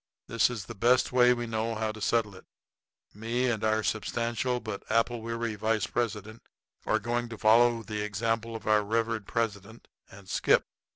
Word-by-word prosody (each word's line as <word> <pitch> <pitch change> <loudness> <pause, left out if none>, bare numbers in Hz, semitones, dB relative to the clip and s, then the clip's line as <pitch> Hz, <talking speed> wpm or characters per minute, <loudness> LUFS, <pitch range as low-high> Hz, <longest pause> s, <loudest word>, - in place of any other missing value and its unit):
This 115 +1 +2
is 115 -5 -5
the 115 - -8
best 120 +4 +3
way 125 -1 +5
we 120 -1 0
know 115 0 -2
how 110 0 -1
to 110 0 -11
settle 110 -1 +1
it. 95 - -14 0.7
Me 115 +4 -1
and 110 -2 -3
our 110 0 +1
substantial 120 +3 -1
but 110 -4 -6
apple 115 +1 +1
weary 115 0 -3
vice 110 0 0
president 110 -1 -3 0.5
are - - +3
going 120 +1 -2
to 115 - -7
follow 115 +2 +4
the 105 0 -4
example 115 +2 -2
of 115 - -8
our 105 -1 +3
revered 115 0 -1
president, 115 -1 -3 0.2
and 100 0 -14
skip. - - +2
115 Hz, 175 wpm, -28 LUFS, 110-120 Hz, 0.7 s, way